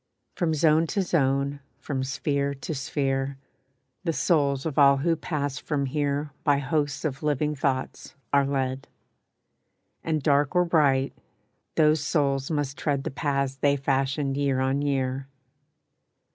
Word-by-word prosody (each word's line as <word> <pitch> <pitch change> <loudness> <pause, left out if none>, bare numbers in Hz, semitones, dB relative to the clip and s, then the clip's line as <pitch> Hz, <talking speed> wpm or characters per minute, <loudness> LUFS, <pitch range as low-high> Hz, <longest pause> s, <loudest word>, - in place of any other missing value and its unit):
From 165 -4 0
zone 160 +1 +3
to 195 +4 0
zone, 140 -4 +1 0.2
from 135 -3 -3
sphere 140 +1 -1
to 140 +3 -5
sphere, 135 -1 -2 0.7
The 165 -3 0
souls 140 -2 +1
of 155 -2 -1
all 140 -1 +7
who 165 +4 +1
pass 145 -4 -3
from 145 -3 -1
here 145 +1 -1
By 145 -2 +3
hosts 145 0 -1
of 140 -2 -2
living 150 0 0
thoughts 135 -2 -2 0.2
are 140 -1 +4
led; 135 -1 -2 1.2
And 155 -3 -1
dark 145 +3 +2
or 180 0 +4
bright, 140 -5 +2 0.6
those 155 -1 +4
souls 140 -3 0
must 145 -3 -2
tread 140 -3 0
The 160 - -3
paths 140 -1 -1
they 140 +1 +2
fashioned 135 +1 0
year 140 -2 +1
on 135 +2 +1
year. 135 -1 -1
140 Hz, 140 wpm, -26 LUFS, 135-150 Hz, 1.2 s, all